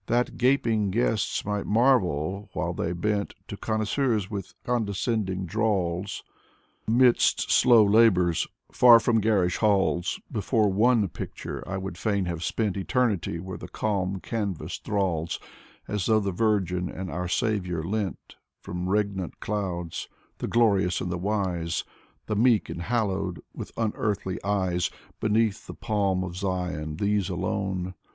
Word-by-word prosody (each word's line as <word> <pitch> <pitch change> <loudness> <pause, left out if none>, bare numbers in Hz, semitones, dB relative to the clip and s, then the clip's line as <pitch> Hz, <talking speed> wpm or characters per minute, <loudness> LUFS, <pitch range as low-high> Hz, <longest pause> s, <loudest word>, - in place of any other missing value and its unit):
That 120 +1 +1
gaping 115 -5 +2
guests 110 0 0
might 105 -1 -2
marvel 100 - +2
while - - -2
they 85 - -2
bent 100 +3 -1
To - - -4
connoisseurs 110 -1 0
with 100 -3 -6
condescending 105 -4 -1
drawls. 100 -2 -1 0.6
Amidst 120 +2 +3
slow 115 -4 +6
labors, 100 -6 +4 0.2
far 120 -2 +8
from 115 0 +2
garish 100 -5 +2
halls, 95 -4 +1
Before 110 0 +1
one 110 +1 +3
picture - - -6
I 100 - -2
would 95 -2 -6
fain 100 -2 0
have 85 -1 -3
spent 105 +1 -1
Eternity: 100 -4 0
where 95 +1 -7
the - - -8
calm 95 -3 -1
canvas 95 -6 -3
thralls 90 -6 -1 0.5
As 105 -3 -2
though 110 -1 +4
the 100 -2 -1
Virgin 90 -3 0
and 95 0 -6
our 90 +1 -3
Saviour 90 -4 -1
leant 100 +1 -4 0.2
From 90 +1 -4
regnant 100 -3 -1
clouds, 90 -5 -3 0.3
the - - -3
Glorious 100 -6 +3
and 90 - -3
the 85 - -2
Wise, 90 -4 -1 0.4
The 110 - -2
meek 115 0 +3
and 85 - -5
hallowed, 100 -5 -1
with - - -7
unearthly 105 -4 -2
eyes, 95 -3 0 0.3
Beneath 110 -1 +1
the - - -8
palm 100 -3 0
of 90 -1 -6
Zion, 90 -5 -2
these 100 +1 0
alone. 95 0 -2
100 Hz, 135 wpm, -26 LUFS, 90-110 Hz, 0.6 s, far